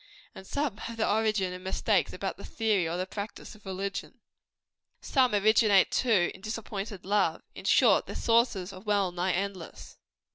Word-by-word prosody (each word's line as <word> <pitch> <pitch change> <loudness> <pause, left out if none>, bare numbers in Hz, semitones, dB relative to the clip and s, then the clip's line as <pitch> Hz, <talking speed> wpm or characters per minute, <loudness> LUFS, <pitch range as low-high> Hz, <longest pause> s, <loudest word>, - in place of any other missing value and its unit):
and 190 - -12
some 285 -7 -2
have 230 +1 -7
their 225 - +1
origin 210 -4 +1
in 180 - -8
mistakes 190 +1 0
about - - -4
the - - -12
theory 210 -7 0
or 170 - -2
the 185 - -2
practice 200 +3 -7
of 210 -2 -16
religion. 195 +1 -5 0.8
Some 255 -6 +2
originate, 210 -1 +4
too, 215 -9 +2
in 190 - -14
disappointed 210 -2 -5
love. 195 -5 +1
In - - -10
short, - - +4
their - - -7
sources 230 -5 +1
are 185 - -10
well 200 -3 +1
nigh 180 +1 -1
endless. 190 -2 -5
200 Hz, 170 wpm, -29 LUFS, 185-220 Hz, 0.8 s, originate